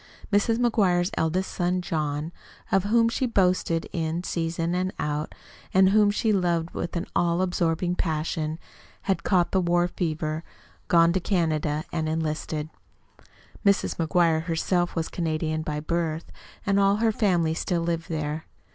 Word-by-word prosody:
Mrs. 215 +3 +3
McGuire's 195 -6 +2
eldest 180 +4 0
son 180 0 0
John 155 -2 -2 0.4
of 195 0 +3
whom 230 +2 +4
she 250 +2 0
boasted 180 -6 +1
in 165 +1 -2
season 165 0 -2
and 185 +1 0
out 150 +1 -3 0.4
and 190 0 +6
whom 210 +1 +5
she 215 +1 +1
loved 175 -3 +1
with 170 - -4
an 170 - -1
all 170 0 +2
absorbing 175 -1 0
passion 155 -2 -2 0.5
had 195 -1 0
caught 180 -3 +2
the 190 - +2
war 175 0 +2
fever, 155 -2 -2 0.4
gone 170 0 +5
to 190 - +1
Canada, 155 -5 0
and 160 -1 -1
enlisted. 155 -1 -2 0.9
Mrs. 200 -2 +2
McGuire 165 -1 +2
herself 175 +1 0
was 165 -2 0
a - - -16
Canadian 155 -2 -1
by 150 -1 -3
birth, 165 0 -2 0.3
and 200 -1 +3
all 200 0 +4
her 225 +1 +2
family 175 -7 +1
still 170 +1 -1
lived 165 -1 -2
there. 155 -1 -3
170 Hz, 150 wpm, -26 LUFS, 160-185 Hz, 0.9 s, and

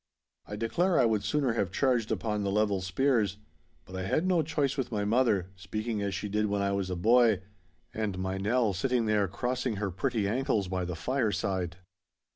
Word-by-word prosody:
I 105 - -5
declare 170 - +1
I 125 - +5
would 110 -3 +1
sooner 140 -1 +1
have 100 -6 -1
charged 120 0 +1
upon 105 0 -1
the 100 - -1
level 100 -1 +1
spears. 105 +1 +1 0.5
But 95 - -10
I 95 - -3
had 155 - +1
no 180 -3 +3
choice 145 -3 0
with 130 -4 -3
my 105 -2 -1
mother, 105 -5 +2
speaking 105 +4 -3
as 100 -2 -2
she 105 - -3
did 105 +1 0
when 100 0 0
I 100 - +1
was 100 -1 -1
a 90 - -2
boy, 110 +1 +4 0.5
and 105 -4 -2
my 95 +1 -2
Nell 110 +1 +1
sitting 120 +5 0
there 105 -2 +2
crossing 125 +5 -2
her 100 -1 -2
pretty 110 +2 -1
ankles 110 -3 0
by 90 0 -2
the 90 -1 -4
fireside. 95 -4 -1
105 Hz, 195 wpm, -29 LUFS, 95-125 Hz, 0.5 s, I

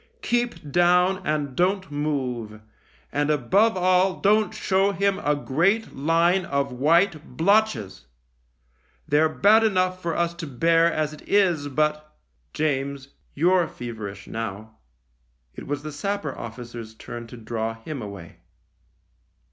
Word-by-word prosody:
Keep 240 -11 -1
down 180 +3 +3
and 150 -3 -1
don't 185 -1 0
move, 130 -7 -3 0.5
and 145 +1 0
above 190 - +2
all 185 +1 +2
don't 210 +1 +3
show 195 +1 +1
him 200 0 +1
a 150 -4 +1
great 175 +11 0
line 165 +6 +2
of 140 -3 -1
white 155 +5 +1
blotches. 160 - +1 1.0
They're 155 +2 +3
bad 210 +7 +4
enough 185 -3 +1
for 170 -2 -2
us 170 0 0
to 165 - -5
bear 165 +5 +3
as 155 -1 -1
it 155 - -12
is, 175 -8 +2
but 150 +2 -1 0.2
" - - -44
" - - -44
James, 140 -2 -2 0.3
you're 175 +3 +3
feverish 105 -5 -7
now." 110 0 -6 0.7
It - - -9
was 145 +1 -3
the 155 - -5
sapper 155 -1 -3
officer's 115 -1 -8
turn 120 +1 -8
to 120 - -11
draw 115 0 -3
him 130 +4 -7
away. 100 -5 -9
155 Hz, 135 wpm, -24 LUFS, 125-185 Hz, 1.0 s, bad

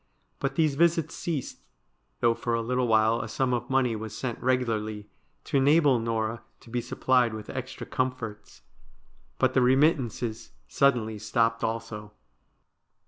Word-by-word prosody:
But 135 0 -2
these 155 -2 +2
visits 165 +1 +2
ceased, 155 -7 -4 0.6
though 120 -1 +4
for 115 0 -2
a 115 - 0
little 125 +1 0
while 110 0 +3
a - - -5
sum 125 +4 0
of 120 - -2
money 130 -3 +2
was 110 0 -6
sent 120 -3 -4
regularly 110 -5 -1 0.3
to - - 0
enable 140 -1 +4
Norah 115 0 -2 0.2
to 115 - -15
be 120 0 -1
supplied 120 -1 +1
with 110 - -7
extra 130 -1 -6
comforts. 125 -5 -4 0.7
But 130 -1 +2
the 130 - +4
remittances 125 - +1
suddenly 115 - +1
stopped 115 +1 0
also. 110 -2 -4
120 Hz, 140 wpm, -27 LUFS, 110-130 Hz, 0.7 s, though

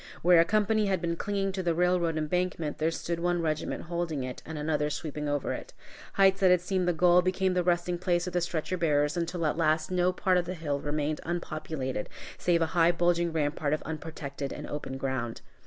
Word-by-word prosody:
Where 175 0 +7
a 165 - +6
company 215 +2 +2
had 190 -2 +1
been 170 -1 -1
clinging 195 +2 -1
to 190 0 -3
the 170 -2 0
railroad 175 -2 +2
embankment, 160 -1 -1
there 155 +1 +2
stood 170 +1 -3
one 175 0 +1
regiment 155 -2 -2
holding 170 -5 -2
it, 125 0 -6
and 160 0 -5
another 150 0 0
sweeping 150 -1 -4
over 145 -1 -1
it. - - -8 0.4
Heights 195 0 +4
that 190 -2 +5
had 180 -1 +5
seemed 185 0 -1
the - - +4
goal, 175 +2 +5
became 185 +1 +1
the 180 - +2
resting 175 0 0
place 175 -1 +1
of 180 - -5
the 175 - +1
stretcher 175 +1 -2
bearers, 150 -2 +2
until 170 0 -2
at 155 - 0
last 155 0 +1
no 180 0 +2
part 185 0 +2
of 175 - -2
the 185 - -4
hill 145 -4 -2
remained 150 +1 -2
unpopulated, 155 -8 -4 0.3
save 170 -2 +2
a 160 - -3
high 170 -1 +5
bulging 175 0 +1
rampart 150 -1 0
of 155 - -2
unprotected 150 -3 -5
and - - -6
open 140 -2 -5
ground. 130 -4 -3
170 Hz, 210 wpm, -29 LUFS, 155-180 Hz, 0.4 s, Where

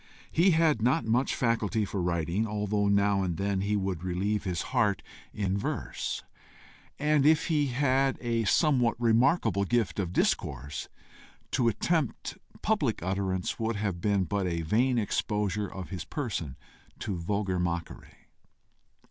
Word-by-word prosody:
He 170 +4 +4
had 160 -7 +3
not 125 0 +2
much 120 +4 +1
faculty 115 -3 +1
for 100 -1 -3
writing, 85 +4 0
although 105 -1 0
now 100 0 +3
and 90 -3 -2
then 100 0 0
he 105 +2 0
would 95 -4 -2
relieve 100 +4 -1
his 90 -2 -1
heart - - +2 0.3
in 100 -2 -1
verse; 100 - -3 0.7
and 150 -1 +2
if 155 +3 +4
he 150 -3 +2
had 135 +1 +2
a 115 -2 -1
somewhat 125 - +3
remarkable 115 - +3
gift 115 0 0
of 90 -3 -1
discourse, 70 -5 -1 0.6
to 120 - +2
attempt 145 - -1 0.2
public - - +1
utterance 95 +1 -1
would 115 0 -1
have 100 -4 -2
been 100 -1 +2
but 95 +2 -1
a 85 -1 -2
vain 120 +9 +2
exposure 105 -2 -1
of 95 -1 -7
his 90 -4 -4
person 95 - -4 0.4
to 100 - -3
vulgar 95 +1 -1
mockery. 85 -1 -4
105 Hz, 140 wpm, -29 LUFS, 95-120 Hz, 0.7 s, He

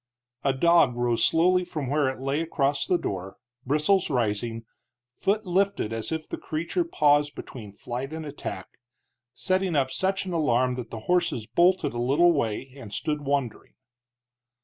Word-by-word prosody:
A 140 - +3
dog 150 -2 +4
rose 120 -1 +1
slowly 180 +3 +3
from 150 -6 -5
where 145 0 +2
it 130 - -6
lay 135 +3 -1
across 145 -3 0
the 180 - +3
door, 95 - -5 0.3
bristles 155 +8 +2
rising, 115 -2 -1 0.5
foot 210 +2 0
lifted 185 - 0
as 110 -1 -4
if 160 -1 -3
the - - -5
creature 170 - -2
paused 145 - +2
between 110 -6 -9
flight 125 +7 -6
and 160 0 -5
attack, 140 -10 -6 0.7
setting 185 -2 0
up 135 -2 +1
such 190 +4 -1
an 185 - -4
alarm 130 -6 +2
that 125 -2 -6
the 115 - -7
horses 175 -8 0
bolted 170 +5 +2
a 120 - -2
little 145 +8 +4
way 130 -3 -2
and 115 -7 -10
stood 150 +8 -2
wondering. 140 -4 -2
145 Hz, 160 wpm, -26 LUFS, 120-170 Hz, 0.7 s, dog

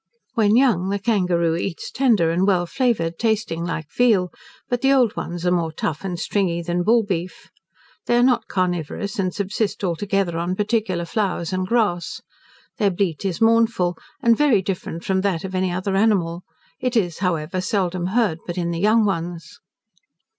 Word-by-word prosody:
When 220 -3 +3
young 225 -8 +3
the 200 - 0
kangaroo 180 -6 +1
eats 170 0 -4
tender 220 -11 +2
and 180 +3 +1
well 180 -3 +2
flavoured, 205 -8 -1
tasting 220 -7 0
like 165 -2 -3
veal, 210 -8 +3 0.3
but 245 -2 -1
the 270 - +3
old 250 -6 +3
ones 175 0 -5
are 180 - +3
more 170 -2 0
tough 155 +1 -3
and 180 -3 -4
stringy 180 -4 -1
than 175 +1 -1
bullbeef. 200 -5 0 0.6
They 240 - +3
are 240 - +4
not 250 -1 +2
carnivorous, 185 +3 -2
and 185 -1 0
subsist 200 +2 -2
altogether 190 -1 -1
on 175 +2 -1
particular 205 -4 -1
flowers 190 -2 -2
and 185 0 -1
grass. 205 -6 0 0.6
Their 205 - +3
bleat 180 -3 -1
is 190 +2 -2
mournful, 225 -6 +3 0.3
and 235 0 +5
very 245 -8 +3
different 180 -2 -4
from 190 -1 +1
that 190 -4 -1
of 190 -1 -6
any 185 -1 0
other 185 +2 -2
animal: 190 -5 +1 0.4
it 250 -1 0
is, 175 -6 0
however, 180 -1 -1
seldom 185 -2 -1
heard 200 -5 +1
but 175 0 -4
in 170 -1 -1
the 165 - -3
young 215 +3 +4
ones. 170 -3 -4
190 Hz, 170 wpm, -22 LUFS, 175-215 Hz, 0.6 s, and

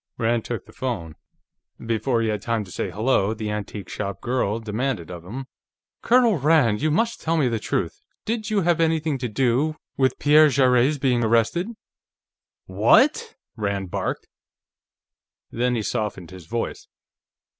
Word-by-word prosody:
Rand 115 0 0
took 120 - -4
the - - -16
phone. 105 - -4 0.6
Before 115 +1 -1
he 110 - 0
had 105 -1 -2
time 115 0 -1
to 95 - -13
say - - -3
"hello," 110 -1 +1
the 110 -1 -4
antique 105 -2 -5
shop 100 -1 -5
girl 120 -4 -1
demanded 110 -5 -3
of 85 -2 -8
him: 125 +9 -7 0.6
"Colonel 235 -7 +4
Rand, 135 -7 +3
you 155 - +2
must 230 +10 0
tell 165 +1 0
me 145 -5 +3
the 115 -2 -1
truth. 85 -5 -2 0.2
Did 220 -1 -2
you 210 -2 +2
have 175 -1 +2
anything 160 -3 +1
to 125 -1 -3
do 130 +6 +1 0.2
with 130 -1 +2
Pierre 150 +1 +6
Jarrett's 130 +1 +3
being 125 -3 +1
arrested?" 115 - +2 1.0
"What?" 450 - +3 0.2
Rand 100 -4 -3
barked. - - -3 1.2
Then 125 +1 0
he 110 - -1
softened 100 -5 -3
his 90 -3 -12
voice. 120 +4 -4
120 Hz, 155 wpm, -23 LUFS, 105-150 Hz, 1.2 s, Pierre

